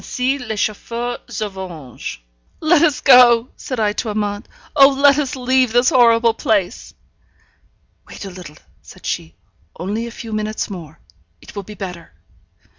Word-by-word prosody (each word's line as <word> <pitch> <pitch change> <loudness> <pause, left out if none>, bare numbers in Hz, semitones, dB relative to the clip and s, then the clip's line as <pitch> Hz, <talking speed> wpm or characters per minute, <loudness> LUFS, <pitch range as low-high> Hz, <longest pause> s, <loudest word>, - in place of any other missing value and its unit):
Ainsi 260 +2 -1
les 220 -4 -5
Chauffeurs 235 +3 -3
se 215 - -3
vengent. 175 - -8 0.4
'Let 315 0 +3
us 310 -5 +2
go!' 250 -2 +6
said 255 -3 -5
I 210 -1 +1
to 220 - -3
Amante. 205 0 -3 0.3
'Oh, 275 -2 +8
let 280 +1 +4
us 275 -3 -2
leave 255 -2 +1
this 245 +1 +4
horrible 235 -4 +4
place!' 205 -6 -1 1.1
'Wait - - -9
a 195 - -7
little,' 180 -4 -11 0.2
said - - -15
she. 80 -1 -4 0.4
'Only 210 +6 -3
a - - -6
few 225 -1 -8
minutes 215 0 -3
more. 165 -4 -9 0.4
It - - -15
will 200 - -3
be 210 +2 -11
better.' 180 - -8
225 Hz, 155 wpm, -19 LUFS, 200-250 Hz, 1.1 s, Oh